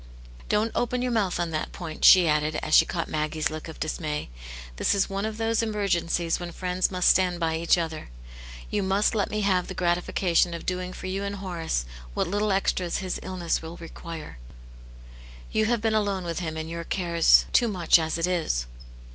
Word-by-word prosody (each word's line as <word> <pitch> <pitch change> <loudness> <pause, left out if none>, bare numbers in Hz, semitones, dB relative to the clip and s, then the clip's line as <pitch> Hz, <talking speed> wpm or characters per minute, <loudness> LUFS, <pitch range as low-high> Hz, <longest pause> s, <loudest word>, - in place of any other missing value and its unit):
Don't 215 +2 +1
open 245 +1 -1
your 250 - 0
mouth 200 -7 0
on 170 -1 -1
that 155 -1 -3
point/' 165 -4 -7
she 180 -2 +8
added, 150 0 +1
as 155 - -3
she - - +7
caught 170 -2 -3
Maggie's 155 0 -1
look 155 +1 -6
of 160 - -10
dismay^ 155 - -3 0.5
"This - - +2
is 195 0 +1
one 195 +1 -2
of 220 -1 -6
those 225 0 +1
emergencies 175 -6 0
when 175 -1 -6
friends 180 +1 -1
must 180 -1 +1
stand 180 -2 +3
by 165 -1 0
each 165 +2 +3
other: 160 - -4 0.6
you 210 - 0
must 195 +3 +2
let 210 -3 0
me 215 - -2
have 185 -3 +1
the 190 - -6
gratification 175 0 +1
of 170 - -8
doing 180 0 -2
for 185 - -9
you 190 +1 -2
and 200 0 -3
Horace 170 - -3 0.3
what - - +1
little 205 +3 0
extras 185 -2 0
his 185 -1 -3
illness 185 -2 -2
will 165 +1 -8
require. 165 - -9 1.1
You 220 - +2
have 235 0 +1
been 225 -1 +1
alone 200 -3 0
with 170 -1 -3
him 160 -3 -4
and 160 0 -4
your 170 +1 -5
cares 170 -2 +3
too 240 - +4
much 175 -5 +4
as 160 0 -1
it 165 - +1
is." 165 - 0
180 Hz, 195 wpm, -26 LUFS, 165-200 Hz, 1.1 s, she